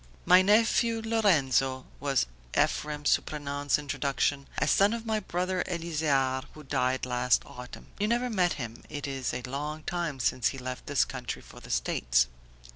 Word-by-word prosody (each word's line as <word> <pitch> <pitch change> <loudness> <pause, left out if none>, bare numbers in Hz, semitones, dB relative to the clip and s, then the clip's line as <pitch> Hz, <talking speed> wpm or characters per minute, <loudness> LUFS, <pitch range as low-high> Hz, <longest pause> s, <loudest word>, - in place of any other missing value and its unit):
"My 180 +1 +7
nephew 225 +3 +3
Lorenzo," 140 - +2
was 140 -2 +1 0.3
Ephrem 150 -1 0
Surprenant's 145 -1 +1
introduction, 140 -1 -1
"a - - +1
son 200 +3 +4
of 230 0 -4
my 220 -1 0
brother 185 -1 -1
Elzear 150 -6 0
who 155 - -11
died 130 -1 0
last 125 0 +2
autumn. 125 0 -10
You 210 - +1
never 240 +2 +1
met 180 -5 +2
him, 120 -4 -7
it 145 -2 -5
is 135 -2 -2
a 125 - -4
long 150 +4 -4
time 170 -6 -3
since 125 0 +1
he 135 - -2
left 130 0 -6
this 145 - +3
country 125 -2 -6
for - - -13
the - - -13
States." - - +2
145 Hz, 160 wpm, -29 LUFS, 130-180 Hz, 0.3 s, My